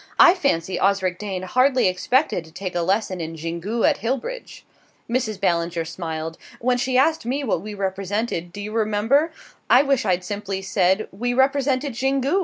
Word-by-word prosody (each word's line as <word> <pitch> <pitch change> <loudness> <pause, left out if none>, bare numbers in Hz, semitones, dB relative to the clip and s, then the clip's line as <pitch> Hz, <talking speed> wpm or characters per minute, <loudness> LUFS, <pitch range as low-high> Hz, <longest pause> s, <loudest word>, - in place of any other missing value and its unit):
"I 350 - +9
fancy 190 - 0
Osric 190 -2 +1
Dane 195 -3 -4
hardly 255 +5 +3
expected 200 - +1
to 160 - -16
take 185 +2 -5
a 175 - 0
lesson 190 0 0
in 165 0 -5
Xingu 170 +8 -1
at - - +2
Hillbridge!" 460 - -4 0.4
Mrs. 230 -4 -1
Ballinger 170 -3 0
smiled. 160 -1 -5 0.2
"When 250 +1 +1
she 255 +1 +1
asked 315 +5 +3
me 265 +5 -2
what 210 -9 0
we 210 +1 -7
represented 195 -1 -2
do 205 - -7
you 210 +1 -5
remember? 225 +8 +2 0.4
I 255 +3 +7
wish 275 -3 +1
I'd 185 -3 +1
simply 200 0 -4
said 190 +2 +1
we 245 +5 -2
represented 270 0 +1
Xingu!" 270 +7 +1
210 Hz, 170 wpm, -22 LUFS, 185-255 Hz, 0.4 s, I